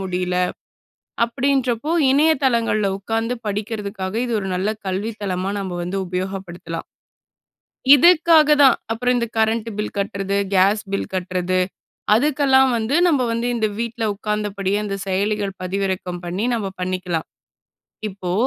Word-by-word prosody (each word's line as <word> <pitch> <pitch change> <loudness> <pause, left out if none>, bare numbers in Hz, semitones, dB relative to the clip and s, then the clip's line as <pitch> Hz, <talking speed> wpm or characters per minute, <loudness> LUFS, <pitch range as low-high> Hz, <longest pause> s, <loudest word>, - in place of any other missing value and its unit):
முடியல." 180 -1 -2 0.9
அப்படீன்றப்போ 265 +2 0 0.2
இணையதளங்கள்ல 260 -8 +2
உட்காந்து 225 +4 -2
படிக்கிறதக்காக, 205 -2 -4
இது 235 - -2
ஒரு 195 - -4
நல்ல 195 +4 -1
கல்வி 195 +4 -2
தளமா 190 0 -2
நம்ம 185 -2 -4
வந்து 190 +3 -3
உபயோகப்படுத்தலாம். 180 -2 -5 1.1
இதுக்காக 315 -1 +6
தான். 270 - +6
அப்புறம் 250 +2 +1
இந்த 235 -1 -1
கரண்ட் 220 +1 +1
பில் 210 - -4
கட்றது, 200 0 -2 0.2
கேஸ் 200 +3 +4
பில் 195 - -2
கட்றது 185 0 -1 0.6
அதுக்கெல்லாம் 265 +1 +4
வந்து, 225 +4 -1
நம்ப 290 -7 +3
வந்து 230 +1 -1
இந்த 220 - +1
வீட்ல 230 0 -3
உட்கார்ந்தபடியே 205 -1 -2
இந்த 195 -1 -3
செயலிகள் 200 +1 -1
பதிவிறக்கம் 185 -1 -2
பண்ணி, 180 +5 -2
நம்ம 220 -4 -2
பண்ணிக்கலாம். 180 -3 -2 0.8
இப்போ, 185 -3 -5
205 Hz, 120 wpm, -21 LUFS, 185-235 Hz, 1.1 s, இதுக்காக